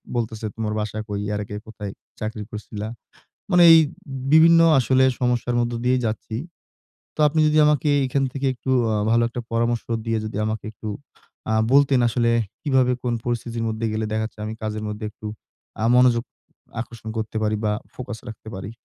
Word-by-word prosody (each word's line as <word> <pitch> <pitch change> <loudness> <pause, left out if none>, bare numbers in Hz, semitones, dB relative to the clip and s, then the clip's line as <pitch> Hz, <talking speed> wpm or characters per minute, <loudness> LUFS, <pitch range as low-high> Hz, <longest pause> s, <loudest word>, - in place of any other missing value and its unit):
বলতেছে, 110 -2 -2
"তোমার 110 -1 -2
বাসা 105 0 -3
কই? 100 -1 -3
এর 105 - -1
আগে 105 - -7
কোথায় 105 -2 -7 0.3
চাকরি 110 0 -4
করছিলা।" 105 0 -6 0.6
মানে 180 -2 +6
এই 165 - +9 0.5
বিভিন্ন 165 +1 +7 0.2
আসলে 130 +2 +3 0.2
সমস্যার 125 -1 0
মধ্য 120 0 -1
দিয়েই 125 0 +3
যাচ্ছি। 110 0 -4 0.8
তো - - -22
আপনি 155 +2 0
যদি 155 0 +2
আমাকে 150 -1 +2 0.2
এখান 135 +2 0
থেকে 140 0 -1
একটু 130 +1 -4 0.2
আ - - +1 0.2
ভালো 115 0 +4
একটা 120 +1 -5
পরামর্শ 115 0 0 0.2
দিয়ে, 115 0 0
যদি 110 -1 -5
আমাকে 110 0 -3
একটু 110 0 -9 0.6
আ - - +2 0.2
বলতেন, 140 -2 +5
আসলে 115 0 +1 0.3
কিভাবে 130 -4 +3
কোন 125 -1 0
পরিস্থিতির 120 -1 -2
মধ্যে 110 +1 -2
গেলে 110 0 -1
দেখা 110 0 0
যাচ্ছে, 110 - -10
আমি 110 - -4
কাজের 110 0 -3
মধ্যে 105 +1 -5
একটু 110 0 -9 0.6
আ - - +3
মনোযোগ 125 -2 +5 0.6
আকর্ষণ 115 -1 -9
করতে 110 0 -3
পারি? 110 0 +1
বা 105 - +2 0.2
ফোকাস 125 -3 -6
রাখতে 110 0 -11
পারি? 95 +3 -6
115 Hz, 175 wpm, -23 LUFS, 110-125 Hz, 0.8 s, এই